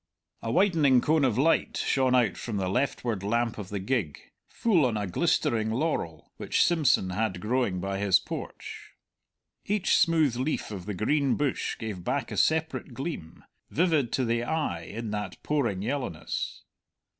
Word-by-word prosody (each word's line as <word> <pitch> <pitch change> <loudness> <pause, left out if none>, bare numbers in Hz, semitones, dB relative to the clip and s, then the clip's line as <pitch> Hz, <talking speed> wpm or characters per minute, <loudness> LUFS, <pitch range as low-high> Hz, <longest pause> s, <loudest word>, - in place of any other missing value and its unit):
A 115 - -3
widening 155 - +4
cone 155 +4 +2
of 125 -5 +2
light 160 +5 +2
shone 130 -2 +2
out 120 -7 +3
from 110 -4 -4
the 95 -1 -1
leftward 120 -2 -1
lamp 115 +3 0
of 95 -3 -7
the 105 - -3
gig, 95 - -2 0.3
full 195 -9 +2
on 110 -3 -1
a 105 - -1
glistering 110 +4 +1
laurel, 110 - -2
which - - +2
Simpson 145 - +2
had 100 -1 -1
growing 110 -3 0
by 95 +1 -3
his 100 -2 +4
porch. - - -8 0.7
Each 205 -2 +1
smooth 160 -7 +3
leaf 130 -2 -2
of 95 -2 -7
the 105 - -3
green 140 +7 +1
bush 145 -3 -1
gave 105 -5 -5
back 135 +5 -2
a - - -4
separate 160 -5 0
gleam, 135 - -6 0.3
vivid 155 -7 +1
to 130 - +1
the 115 0 0
eye 120 - -2
in 110 +3 -5
that 105 -3 -4
pouring 120 -11 0
yellowness. 125 - -3
120 Hz, 160 wpm, -27 LUFS, 100-145 Hz, 0.7 s, widening